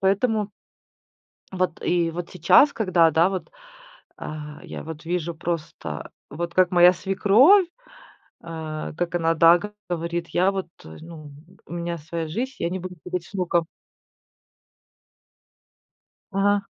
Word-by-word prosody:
поэтому. 205 +2 +1 1.0
Вот 185 -2 -2
и 170 -1 +1
вот 170 +1 -6
сейчас, 185 - +5
когда 185 -7 +3
да, 165 +4 +4
вот, 190 -2 -5 0.7
а, 150 -1 -8
я - - -7
вот 160 0 -9
вижу 170 0 -2
просто, 165 -1 -5 0.2
вот 170 +3 -5
как 185 -1 +4
моя 175 0 +7
свекровь, 205 - +4 0.8
э, 160 -2 -6
как 175 0 -2
она, 165 -1 +2
да, 165 +1 +6
как 210 +3 -8 0.2
говорит: 170 0 -3
"Я 185 +2 +2
вот 190 -3 -4 0.2
ну 155 - -11 0.3
у - - -10
меня 170 0 -3
своя 160 +1 -5
жизнь, 240 +12 -3
я 170 - -1
не 185 +2 -3
буду 180 0 -7
говорить 180 -1 -4
с - - -19
внуком". 175 -3 0 2.7
Ага. 200 +1 +1
175 Hz, 130 wpm, -24 LUFS, 165-190 Hz, 2.7 s, моя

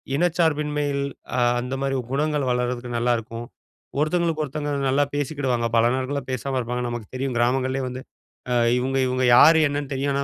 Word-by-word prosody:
இனச்சார்பின்மையில் 150 -4 0 0.3
அ, - - +2 0.2
அந்த 125 +2 -5
மாரி 135 0 0 0.2
குணங்கள் 145 -1 0
வளர்றதுக்கு 125 0 -2
நல்லாருக்கும். 115 -1 -1 0.5
ஒருத்தவங்களுக்கு 160 0 +1
ஒருத்தவங்க 145 +1 -4 0.2
நல்லா 140 +2 +3
பேசிக்கிடுவாங்க. 135 -5 -1
பல 115 0 +4
நாட்களா 135 +2 -2
பேசாம 130 +1 -2
இருப்பாங்க. 125 0 -3
நமக்கு 120 -3 -5
தெரியும். 130 -1 -2
கிராமங்கள்லேயே 130 +2 +1
வந்து, 125 +1 -6 0.5
அ, - - +2 0.2
இவங்க 130 +2 -1
இவங்க 130 0 0
யாரு 160 +5 +8
என்னன்னு 145 0 -4
தெரியும். 140 +1 -1
ஆனா, 140 - 0
135 Hz, 150 wpm, -23 LUFS, 125-145 Hz, 0.5 s, யாரு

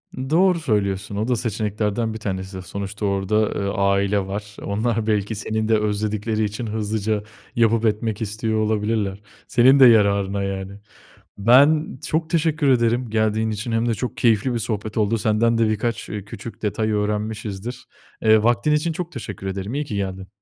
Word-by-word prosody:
Doğru 165 +7 +2
söylüyorsun, 100 -7 -1
o 105 +3 -1
da 125 - +2
seçeneklerden 110 0 -1
1 110 - -6
tanesi, 95 -2 -4
sonuçta 100 +3 -5
orada, 100 +2 +1
eee, 100 - -2
aile 100 0 +1
var. 100 +1 -6
Onlar 110 +2 -1
belki 105 0 0
seni 110 +1 -2
de 110 -1 +4
özledikleri 105 +1 -1
için 105 +3 -3
hızlıca 110 -1 -1 0.3
yapıp 115 -1 +3
etmek 110 0 -1
istiyor 110 +1 -1
olabilirler. 105 -2 -1 0.3
Senin 130 +3 +5
de 130 - +9
yararına, 100 -3 +4
yani. 100 0 -5 0.6
Ben 140 +8 +4
çok 160 +1 -1
teşekkür 160 -3 +1
ederim 120 -1 +2
geldiğin 110 0 +1
için 110 +3 -4
hem 115 +1 +1
de - - +2
çok 125 +3 -4
keyifli 115 +1 +2
bir 120 - -1
sohbet 110 -1 -3
oldu. 110 +1 +2
Senden 115 +2 +2
de 115 -1 +3
birkaç, 110 +1 -2
ııı, 105 -2 -5
küçük 110 +2 -9
detay 110 +1 -1
öğrenmişizdir. 105 +2 -3 0.4
Eee, 110 -1 +5
vaktin 120 +5 +2
için 150 +3 +1
çok 175 +1 -5
teşekkür 105 -6 -7
ederim, 95 +4 -4
iyi 145 +1 -2
ki 105 - -5
geldin. 95 -1 -4
110 Hz, 165 wpm, -22 LUFS, 100-115 Hz, 0.6 s, de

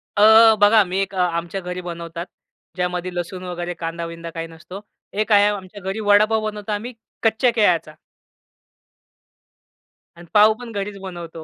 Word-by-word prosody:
अ, 220 +1 +7
बघा 205 +1 +6
मी 185 +1 -3
एक 195 0 -2
अ, - - -6
आमच्या 175 +1 -1
घरी 180 0 -5
बनवतात. 170 -1 -6 0.5
ज्यामध्ये 180 0 -2
लसूण 180 +1 -5
वगैरे, 175 -1 -5
कांदा-बिंदा 165 0 -6
काही 165 0 -6
नसतो. 170 +4 -11 0.3
एक 215 +2 -2
आहे 205 0 +6
आमच्या 205 0 -5
घरी 195 +3 -4
वडापाव 215 +1 +3
बनवतो 210 0 -7
आम्ही, 225 +4 -4 0.3
कच्च्या 225 +2 +3
केळ्याचा. 175 -7 +2 2.2
आणि 175 - -12
पाव 215 +1 +6
पण 245 -2 -9
घरीच 200 -1 -5
बनवतो 170 -4 -8
190 Hz, 145 wpm, -21 LUFS, 175-210 Hz, 2.2 s, अ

